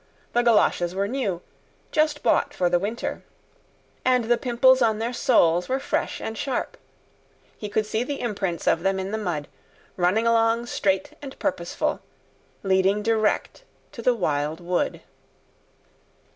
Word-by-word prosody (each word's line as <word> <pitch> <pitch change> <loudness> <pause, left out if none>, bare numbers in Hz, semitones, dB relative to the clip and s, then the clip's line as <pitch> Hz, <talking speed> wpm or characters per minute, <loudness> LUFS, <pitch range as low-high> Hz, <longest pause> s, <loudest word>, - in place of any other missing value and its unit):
The 240 - +3
goloshes 210 -6 +2
were 200 +1 0
new, 205 -8 -2 0.5
just 305 -1 +1
bought - - +2
for 175 -1 +1
the 175 - +3
winter, 210 +5 -3 0.8
and 255 -1 +3
the 240 +1 +2
pimples 255 +1 +4
on 220 -2 +3
their 230 +3 -2
soles 180 -10 +3
were 265 +1 +1
fresh - - -2
and 220 - -5
sharp. 255 +3 -3 0.8
He 210 - -6
could 215 +1 0
see 220 +1 -1
the 280 +2 -4
imprints 195 -7 -3
of - - +2
them 195 0 0
in 190 +1 -4
the 220 - -2
mud, 165 -8 -3 0.5
running 185 +5 +2
along 230 0 +3
straight 195 -5 -1
and 275 -2 -9
purposeful, - - -2 0.6
leading 195 +2 +2
direct 220 - 0 0.3
to 230 - -8
the 245 +1 +3
Wild 155 -5 -1
Wood. 175 0 -1
215 Hz, 145 wpm, -24 LUFS, 190-240 Hz, 0.8 s, pimples